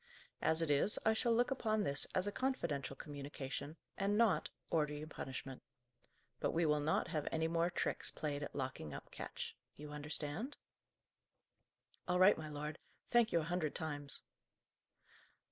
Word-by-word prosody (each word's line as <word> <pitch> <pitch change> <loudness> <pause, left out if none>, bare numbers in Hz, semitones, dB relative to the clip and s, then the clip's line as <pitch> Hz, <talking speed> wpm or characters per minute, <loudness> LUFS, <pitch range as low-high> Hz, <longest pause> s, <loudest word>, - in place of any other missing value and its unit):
As 160 +1 +5
it 155 - +1
is, 145 +9 +5
I 220 - +6
shall 235 +2 +2
look 240 +3 +3
upon 220 -5 +1
this 140 -6 +1
as 185 - +3
a 205 - 0
confidential 170 - -1
communication, 140 +1 -5 0.2
and 200 +1 +2
not 230 -3 +4 0.2
order 150 -2 +2
you 150 +1 -5
punishment. 135 -3 -6 0.8
But - - 0
we 165 +1 +3
will 150 -1 +3
not 155 +3 +1
have 155 -3 -1
any 160 0 +1
more 170 +1 +2
tricks 175 - 0
played 145 -2 -3
at 145 - -5
locking 130 - -3
up - - -9
Ketch. - - -5 0.2
You 150 0 -8
understand?" 150 - -2 1.5
"All 180 0 +3
right, 185 +3 +8
my 155 -1 -6
lord. 150 +1 -4 0.3
Thank 240 -2 +5
you 170 - +3
a 165 +3 -4
hundred 160 -5 0
times." 145 -3 -2
155 Hz, 160 wpm, -38 LUFS, 145-185 Hz, 1.5 s, right